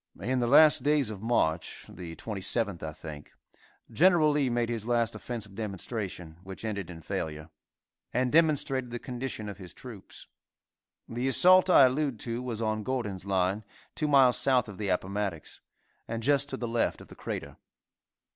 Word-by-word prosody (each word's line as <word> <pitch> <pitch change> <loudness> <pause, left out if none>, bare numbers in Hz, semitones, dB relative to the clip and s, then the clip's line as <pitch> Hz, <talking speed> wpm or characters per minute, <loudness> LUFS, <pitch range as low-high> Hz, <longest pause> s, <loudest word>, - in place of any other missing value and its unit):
In 130 +1 -1
the 120 - 0
last 150 +2 +6
days 145 -4 +2
of 100 -3 -8
March, 85 -9 -1
the 85 -2 -9
27th, 100 -1 -2
I 80 - -4
think, 75 -1 -10 0.6
Gen. 165 -3 +4
Lee 145 -3 +1
made 120 -1 0
his 115 -2 -3
last 120 -2 +1
offensive 110 -2 -6
demonstration, 95 -5 -5
which 95 +3 -9
ended 100 -5 -4
in 80 -2 -10
failure, 75 +1 -5 0.6
and 125 +1 0
demonstrated 145 -5 +2
the 120 - -4
condition 125 -3 -5
of 100 0 -8
his 90 -2 -9
troops. 115 -7 -11 0.8
The 120 +3 -3
assault 185 +8 +6
I 140 -6 +8
allude 130 -2 0
to 120 0 -3
was 115 -3 -3
on 110 0 -1
Gordon's 105 -6 -3
line, 95 +2 0 0.3
two 155 - -1
miles 135 -4 +5
south 130 -3 +3
of 105 -2 -10
the 105 - -2
Appomattox, 95 -2 -3 0.5
and 115 0 -4
just 140 +2 +3
to 135 - -2
the 120 - -4
left 115 0 0
of - - -14
the - - -12
Crater. - - -6
115 Hz, 165 wpm, -29 LUFS, 95-130 Hz, 0.8 s, I